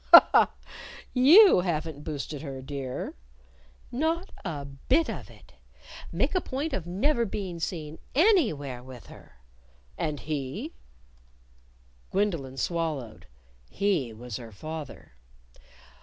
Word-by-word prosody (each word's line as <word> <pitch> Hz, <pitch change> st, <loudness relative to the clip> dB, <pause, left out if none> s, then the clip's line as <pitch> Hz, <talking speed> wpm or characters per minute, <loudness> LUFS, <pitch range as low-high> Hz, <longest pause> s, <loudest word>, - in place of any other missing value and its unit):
"Ha! -, -, +12 dB
ha! -, -, +5 dB, 0.6 s
You 315 Hz, -, +8 dB
haven't 160 Hz, -4 st, -2 dB
boosted 150 Hz, -1 st, -5 dB
her, 135 Hz, -3 st, -6 dB
dear?" 135 Hz, -2 st, -4 dB, 0.8 s
"Not 325 Hz, +8 st, -1 dB
a 150 Hz, -7 st, -4 dB
bit 195 Hz, -, +1 dB
of -, -, -7 dB
it! -, -, -18 dB, 0.6 s
Make -, -, 0 dB
a 370 Hz, -, +2 dB
point 285 Hz, +3 st, -3 dB
of 170 Hz, -3 st, -3 dB
never 235 Hz, +8 st, +1 dB
being 190 Hz, -5 st, -4 dB
seen 160 Hz, -2 st, -4 dB, 0.2 s
_any_where 215 Hz, -, +3 dB
with 130 Hz, -2 st, -11 dB
her." -, -, -16 dB, 0.7 s
"And 150 Hz, -3 st, -2 dB
he?" 140 Hz, -4 st, -4 dB, 1.4 s
Gwendolyn 170 Hz, -10 st, -1 dB
swallowed. 155 Hz, -9 st, -2 dB, 0.4 s
He 185 Hz, -, 0 dB
was 115 Hz, 0 st, -7 dB
her 115 Hz, -2 st, -9 dB
father. 155 Hz, +8 st, -8 dB
160 Hz, 110 wpm, -28 LUFS, 135-210 Hz, 1.4 s, Ha